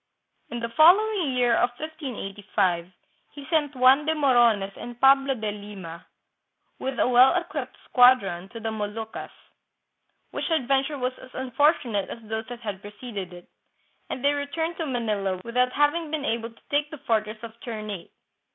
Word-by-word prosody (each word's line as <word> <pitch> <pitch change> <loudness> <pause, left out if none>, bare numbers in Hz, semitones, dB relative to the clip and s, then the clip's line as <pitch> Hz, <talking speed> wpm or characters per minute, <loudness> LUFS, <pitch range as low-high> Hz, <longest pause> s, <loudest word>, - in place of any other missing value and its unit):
" - - -46
In 240 - -5
the 235 - -3
following 355 - +4
year 245 -2 +3
of 240 +2 +3
1585, 205 - -3 0.4
he 285 -1 -10
sent 295 -3 +1
Juan 260 +3 +5
de 320 - +2
Morones 240 -9 +3
and 240 0 -9
Pablo 270 0 +5
de 215 -3 -3
Lima, 200 -5 -9 0.7
with 265 -1 -3
a - - +3
well 255 +5 +6
equipped 345 -1 -3
squadron, 200 -8 +4
to 230 - -8
the 225 0 -3
Moluccas, 220 +1 -5 1.0
which - - -3
adventure 275 -1 +1
was 255 -1 -1
as 260 - -12
unfortunate 255 - +1
as 230 - -8
those 220 +1 -4
that 245 -1 -8
had 205 -4 -5
preceded 205 -3 -7
it, 175 0 -12 0.6
and 260 - -4
they 285 - +4
returned 320 +4 -3
to 325 - -3
Manila 210 -7 -1
without 250 +2 +1
having 300 +2 +1
been 300 -2 -3
able 230 -2 -1
to 230 - -22
take 290 +1 +1
the 310 - -8
fortress 220 -5 -1
of 230 -1 -7
Ternate. 215 -5 -6
245 Hz, 160 wpm, -25 LUFS, 215-285 Hz, 1.0 s, well